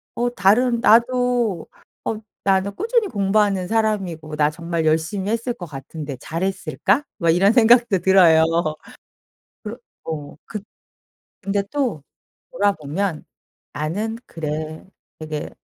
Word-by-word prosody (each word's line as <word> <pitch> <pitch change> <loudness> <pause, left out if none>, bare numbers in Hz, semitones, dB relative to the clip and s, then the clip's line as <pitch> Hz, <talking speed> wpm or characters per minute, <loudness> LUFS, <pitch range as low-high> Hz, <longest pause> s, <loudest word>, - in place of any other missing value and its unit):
어 245 +1 0
다른 235 +6 +3
나도 235 -4 +3 0.4
어 - - -1 0.3
나는 195 +1 +1
꾸준히 460 0 +1
공부하는 200 - +1
사람이고 195 -8 -1
나 150 0 +3
정말 170 0 -3
열심히 170 +6 0
했을 230 +2 -1
것 180 - -8
같은데 145 0 -7
잘했을까?' 190 - -1
뭐 170 -4 0
이런 195 +5 +4
생각도 235 -4 +5
들어요. 175 -3 +6 1.2
그러 220 +2 -6 0.3
어 150 -3 -6
그 215 - -6 0.8
근데 200 0 -1
또 250 - -1 0.5
돌아보면 195 - -1 0.5
'나는 205 +10 -3
그래. 155 0 -5 0.4
되게 155 -1 -5
195 Hz, 235 characters per minute, -21 LUFS, 160-225 Hz, 1.2 s, 들어요